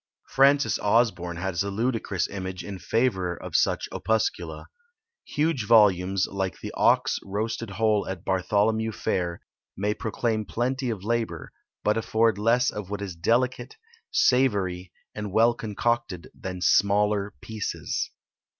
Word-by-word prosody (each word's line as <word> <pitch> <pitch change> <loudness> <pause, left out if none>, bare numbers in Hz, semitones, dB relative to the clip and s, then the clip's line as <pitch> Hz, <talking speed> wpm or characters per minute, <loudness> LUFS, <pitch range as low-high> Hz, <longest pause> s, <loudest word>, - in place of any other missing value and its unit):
Francis 140 +1 +4
Osborne 100 -6 +1
has 85 -1 -2
a 100 - -1
ludicrous 110 -4 -1
image 95 -2 -5
in 100 -2 -7
favour 95 -8 0
of - - -8
such - - +2
opuscula. 110 0 -1 0.6
"Huge 145 -7 -1
volumes, 95 -4 +4
like 95 -2 -3
the - - -6
ox - - +2
roasted 110 +3 -3
whole 105 +1 +1
at 95 -2 -6
Bartholomew 105 +4 +1
fair, 85 -3 -2 0.4
may 105 +2 0
proclaim 110 -1 -2
plenty 125 +4 -2
of 105 -5 -4
labour, 115 +1 -2 0.3
but 105 +1 +2
afford 110 -1 +1
less 120 +4 +3
of 105 -3 -6
what 100 0 -4
is 95 -3 -6
delicate, 125 - 0 0.3
savoury, 100 - +2 0.2
and 105 -2 -5
well 115 +4 +4
concocted, 115 -4 -2
than 90 -1 -7
SMALLER 100 +1 +2
PIECES." 110 -2 -3
105 Hz, 130 wpm, -26 LUFS, 95-115 Hz, 0.6 s, Francis